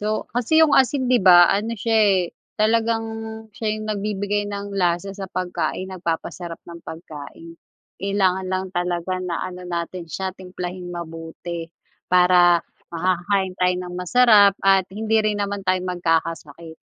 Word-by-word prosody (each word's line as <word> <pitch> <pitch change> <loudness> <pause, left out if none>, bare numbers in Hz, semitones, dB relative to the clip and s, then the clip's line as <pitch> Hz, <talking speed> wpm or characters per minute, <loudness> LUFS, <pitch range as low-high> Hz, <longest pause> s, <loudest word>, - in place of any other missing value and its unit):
So, 215 +1 -1
kasi 250 +7 +3
yung 295 - +1
asin, 260 -1 +3
'di 250 -3 +4
ba, 175 -2 +7
ano 220 +3 -1
siya 225 +2 0
eh, 200 -3 +4 0.4
talagang 225 +1 +2 0.5
siya 215 -1 -2
yung 215 - -6
nagbibigay 205 0 -2
ng 200 0 -5
lasa 180 0 0
sa 195 -1 -7
pagkain, 185 +1 -3
nagpapasarap 170 -1 -4
ng 170 0 -10
pagkain, 160 0 -10 0.5
kailangan 190 -1 +1
lang 185 0 -1
talaga 175 0 -2
na 180 -2 -3
ano 180 0 -7
natin 170 0 -4
siya, 190 +4 -4
timplahing 180 -1 -7
mabuti, 165 0 -7 0.4
para 180 -1 +5 0.2
makakakain 185 +2 0
tayo 180 0 +3
ng 180 0 -8
masarap 205 +1 +5
at 195 -1 +5
hindi 220 +3 -1
rin 215 -1 0
naman 200 0 -2
tayo 185 0 +2
magkakasakit. 165 -2 -2
185 Hz, 140 wpm, -22 LUFS, 175-205 Hz, 0.5 s, ba